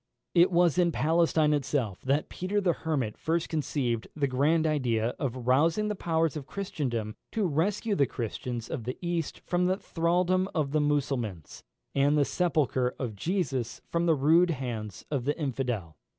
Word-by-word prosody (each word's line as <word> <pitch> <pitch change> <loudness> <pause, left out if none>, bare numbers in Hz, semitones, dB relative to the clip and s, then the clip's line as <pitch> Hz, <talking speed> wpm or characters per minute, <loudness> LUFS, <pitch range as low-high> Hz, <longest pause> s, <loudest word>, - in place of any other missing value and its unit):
It 175 +2 +5
was 175 -1 +3
in 175 -1 +4
Palestine 160 -1 +2
itself 135 -8 -1
that 140 +3 0
Peter 190 +3 -2
the 185 -4 +2
Hermit 135 -11 -2
first 165 +1 -1
conceived 135 -7 -1
the 145 -2 +1
grand 145 +5 +2
idea 120 -7 +1
of 130 -3 -3
rousing 160 +11 +3
the 210 - -1
powers 165 -4 0
of 145 -3 -6
Christendom 125 - -3 0.2
to 215 -3 +1
rescue 190 +7 0
the 140 -9 +3
Christians 120 0 -4
of 125 -8 -5
the 125 +2 -4
East 170 -3 -3
from 180 0 0
the 185 +1 +1
thraldom 180 +2 +1
of 150 -4 0
the 155 0 +2
Mussulmans, 135 - -2 0.3
and 140 +2 +3
the 145 - +4
sepulchre 140 -8 +1
of 120 -5 -4
Jesus 135 - -2
from 170 0 +1
the 165 - +5
rude 160 +6 +4
hands 115 - -4
of 135 -4 -1
the 145 - 0
infidel. 125 - -3
150 Hz, 165 wpm, -28 LUFS, 125-170 Hz, 0.3 s, It